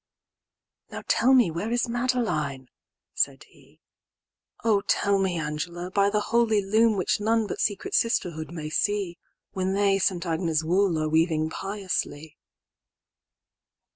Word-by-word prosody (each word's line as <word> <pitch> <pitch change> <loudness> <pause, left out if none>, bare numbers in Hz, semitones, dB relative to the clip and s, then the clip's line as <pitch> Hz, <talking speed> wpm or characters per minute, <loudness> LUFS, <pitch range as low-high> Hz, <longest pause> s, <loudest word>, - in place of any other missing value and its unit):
"Now - - -7
tell 255 - +3
me 240 -10 +4
where 170 +7 -3
is 240 +1 0
Madeline," 225 - -1 0.4
said - - -1
he,"O 215 -3 -6
tell 200 -1 +2
me, 190 -2 0
Angela, 170 +4 -4
by 200 +1 +3
the 210 +1 +1
holy 230 -1 +2
loom"Which 215 -2 +2
none 225 +1 +1
but - - -5
secret 205 -2 -2
sisterhood 170 -9 0
may 155 -3 -6
see,"When 190 +1 -3
they 200 0 +2
St. 180 -2 0
Agnes' 165 -1 0
wool 180 +1 +2
are 155 0 0
weaving 160 0 +1
piously." 185 -7 -4
190 Hz, 120 wpm, -26 LUFS, 160-210 Hz, 0.4 s, me